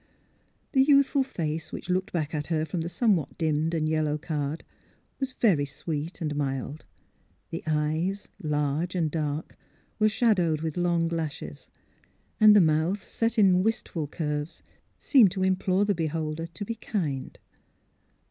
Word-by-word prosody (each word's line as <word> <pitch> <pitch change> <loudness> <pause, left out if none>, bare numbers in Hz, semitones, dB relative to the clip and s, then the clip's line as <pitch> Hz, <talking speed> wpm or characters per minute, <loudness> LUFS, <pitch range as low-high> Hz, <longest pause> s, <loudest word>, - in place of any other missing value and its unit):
The 265 - +4
youthful 280 0 +4
face 160 - -3
which - - -7
looked 185 +1 0
back 155 -3 -2
at 150 -1 -2
her 160 -2 0
from 165 +2 -3
the 165 - -3
somewhat 195 - +1
dimmed 160 0 0
and 155 -1 0
yellowed 155 -1 0
card 150 -1 -3 0.6
was 265 -2 -3
very 185 - +3
sweet 155 +4 -5
and 150 -2 -2
mild; 140 +1 -3 0.7
the 165 - -4
eyes, 160 +6 -1
large 150 +3 -1
and 165 -4 0
dark, 150 0 -3 0.4
were 215 0 +5
shadowed 185 -9 +2
with 160 -2 -3
long 175 -1 +1
lashes, 155 - -5 0.7
and 215 -1 +8
the 205 - +8
mouth, 165 +5 +1
set 230 +1 -1
in 190 -4 +5
wistful 185 -7 -1
curves, 150 0 -4 0.3
seemed 245 -9 +5
to 190 -1 -1
implore 190 +1 +2
the 205 - +2
beholder 160 -1 -2
to 190 +5 -7
be 230 - -3
kind. 170 - -3
165 Hz, 145 wpm, -27 LUFS, 150-190 Hz, 0.7 s, and